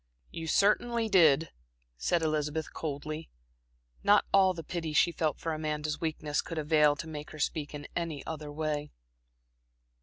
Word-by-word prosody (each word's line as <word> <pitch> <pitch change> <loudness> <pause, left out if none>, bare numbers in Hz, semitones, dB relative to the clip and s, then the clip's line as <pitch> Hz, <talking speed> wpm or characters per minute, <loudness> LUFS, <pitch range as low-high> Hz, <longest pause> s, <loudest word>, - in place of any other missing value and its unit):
"You 165 0 -6
certainly 225 +6 +2
did," 165 -5 +5 0.4
said 170 - 0
Elizabeth, 155 0 -1
coldly. 155 +1 -5 0.7
Not - - +5
all 190 -2 +5
the 165 - -6
pity 165 -1 -4
she 170 - +4
felt 155 -3 -1
for 165 - -3
Amanda's 155 -1 -3
weakness 155 -2 -1
could 165 - -7
avail 150 -1 +4
to 165 - -6
make 150 -1 -7
her 155 - -10
speak 150 -1 -2
in 145 0 -7
any 165 -4 -3
other 150 -2 -5
way. 150 -1 -2
155 Hz, 150 wpm, -30 LUFS, 150-165 Hz, 0.7 s, did